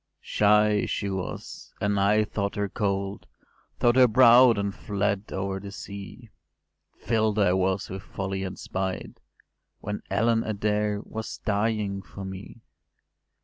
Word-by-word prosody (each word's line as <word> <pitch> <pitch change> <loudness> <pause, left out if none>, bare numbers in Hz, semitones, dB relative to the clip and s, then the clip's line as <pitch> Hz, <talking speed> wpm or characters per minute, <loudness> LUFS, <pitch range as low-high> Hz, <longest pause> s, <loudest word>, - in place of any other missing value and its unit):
“Shy 105 0 +3
she 100 -1 -2
was, 95 -2 -6
and 100 0 +1
I 105 +2 +4
thought 100 -1 -3
her 105 0 -1
cold; 100 0 -2 0.5
Thought 120 +1 +3
her 130 -1 +8
proud, 120 0 +7
and 100 0 -1
fled 100 0 -2
over 95 0 -2
the 100 0 -8
sea; 100 +4 -9 0.7
Fill’d 110 -1 +1
I 100 -4 +4
was 95 +1 0
with 95 +1 -6
folly 95 -1 -4
and 95 0 -5
spite, 95 0 -4 0.6
When 105 +1 -5
Ellen 115 +3 +2
Adair 105 -1 -1
was 110 0 -6
dying 105 -2 0
for 95 +1 -9
me. 95 +4 -9
100 Hz, 135 wpm, -26 LUFS, 95-110 Hz, 0.7 s, her